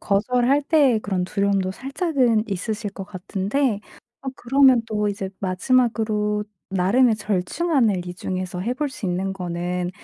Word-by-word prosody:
거절할 250 +7 +2
때의 280 -6 +4
그런 195 -3 -2
두려움도 200 -1 0
살짝은 265 - 0
있으실 205 +2 -3
것 195 -1 -7
같은데 200 +6 -1 0.4
어 270 - -4
그러면 260 -1 +4
또 210 -1 -1
이제 195 -1 -4
마지막으로 210 +1 +1 0.3
나름의 220 +6 +4
절충안을 210 - 0
이 175 - -6
중에서 185 -1 -4
해 235 +7 -1
볼 295 +3 -1
수 255 -6 -6
있는거는 180 -1 -2
210 Hz, 305 characters per minute, -23 LUFS, 190-255 Hz, 0.4 s, 때의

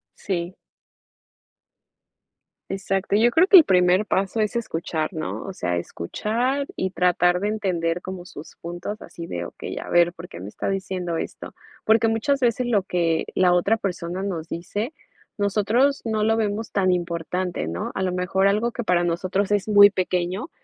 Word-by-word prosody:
Sí. 180 -1 -4 2.1
Exacto, 195 0 -1
yo 230 +3 +4
creo 325 +9 +4
que 390 - +8
el 340 - +10
primer 180 0 +3
paso 195 +2 0
es 215 +1 0
escuchar, 165 -7 -3
¿no?, 155 -1 -4
o 195 - -6
sea, 90 - -1
escuchar 235 - -2
y 190 - -1
tratar 180 -1 +2
de 205 - 0
entender 180 -5 -1
como 185 -1 -7
sus 150 -3 -11
puntos, 175 +5 -6
así 170 - -9
de: 85 - -4
"Okey, - - -7
a - - -8
ver, 175 0 +4
¿por 175 0 -10
qué - - -10
me 95 +3 -7
está - - -4
diciendo 185 -3 -2
esto?", - - -6 0.3
porque 220 +1 +4
muchas 225 +6 +1
veces 245 0 +1
lo 215 -5 +2
que 170 -3 0
la 180 -1 +4
otra 200 +6 +2
persona 180 -3 -4
nos 170 -5 -4
dice, 205 - -4 0.5
nosotros 215 +7 +2
no 220 -2 0
lo 225 +1 +3
vemos 215 0 -2
tan 190 -2 +2
importante, 175 - -2
¿no? 85 +2 -4
A - - -2
lo 185 -1 0
mejor, 180 +2 +1
algo 215 +4 +1
que 240 - -4
para 175 -3 +2
nosotros 185 +3 -1
es 205 -2 +1
muy 205 -1 +8
pequeño, 185 - -2
190 Hz, 170 wpm, -23 LUFS, 175-215 Hz, 2.1 s, el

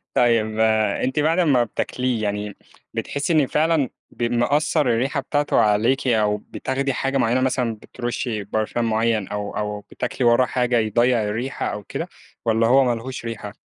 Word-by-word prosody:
طيّب، 110 -3 +2
آآ، 110 -2 +2
أنتِ 130 +3 0
بعد 160 +4 +2
امّا 140 -8 +4
بتاكليه، 120 0 -2
يعني 105 0 -3 0.4
بتحسي 140 +4 -2
إن 150 -4 +3
فعلًا 155 -2 +1 0.2
ب - - -5
مأثّر 120 +7 +2
الريحة 130 +4 +1
بتاعتُه 145 +2 0
عليكِ، 110 +6 +2
أو 105 -3 +2
بتاخدي 135 +5 -3
حاجة 135 +2 -1
معيّنة 125 +1 +2
مثلًا 125 -3 0
بترشي 120 -1 -4
برفان 110 +3 -1
معيّن، 110 -2 +1
أو 105 0 -4
أو 105 0 -2
بتاكلي 120 +4 -2
وراه 120 +2 +5
حاجة 125 0 +1
يضيّع 115 +2 +2
الريحة 110 +6 -3
أو 105 - -4
كده، - - -5 0.4
والَّا 115 0 +3
هو 135 +3 +5
ما 120 -2 +1
لهوش 125 +1 -7
ريحة؟ 105 -3 -6
120 Hz, 160 wpm, -22 LUFS, 110-130 Hz, 0.4 s, وراه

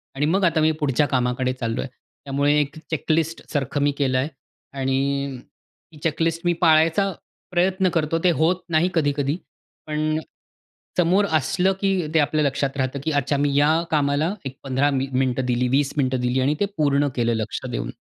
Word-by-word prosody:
आणि 145 +2 0
मग 190 +5 +1
आता 165 -2 +2
मी 160 +1 +4
पुढच्या 145 -1 +2
कामाकडे 125 0 0
चाललो 115 -2 -3
आहे. - - -6 0.4
त्यामुळे 140 +1 +1
एक 145 +1 -4
चेक 160 +1 -1
लिस्टसारखं 150 -3 -1
मी 145 0 +3
केलं 130 -3 +1
आहे 135 +4 0 0.5
आणि 135 0 -1 0.5
ती 155 - -15
चेक 165 0 -1
लिस्ट 165 0 +1
मी 175 - +3
पाळायचा 165 +4 +4 0.4
प्रयत्न 185 +1 +2
करतो, 165 0 +1
ते 180 - +5
होत 170 +3 +1
नाही 165 +3 +2
कधी-कधी. 145 -1 0 0.5
पण 155 +1 0 0.8
समोर 180 +4 +3
असलं, 185 +7 +1
की 190 -5 +1
ते 160 - +4
आपल्या 150 0 +2
लक्षात 140 0 -1
राहतं, 130 +1 -1
की 160 - -1
अच्छा 145 0 0
मी 140 0 +1
या 145 +2 +4 0.2
कामाला 150 +4 +1
एक 135 0 -6
15 135 +1 +1
मि 135 0 -1
मिनिटं 130 0 0
दिली, 125 0 +1
20 135 +2 +1
मिनिटं 130 -2 +1
दिली 125 +1 0
आणि 145 +3 +1
ते 205 - +2
पूर्ण 145 -1 +2
केलं 120 -1 +1
लक्ष 110 -1 -3
देऊन. - - -4
145 Hz, 180 wpm, -23 LUFS, 135-160 Hz, 0.8 s, ते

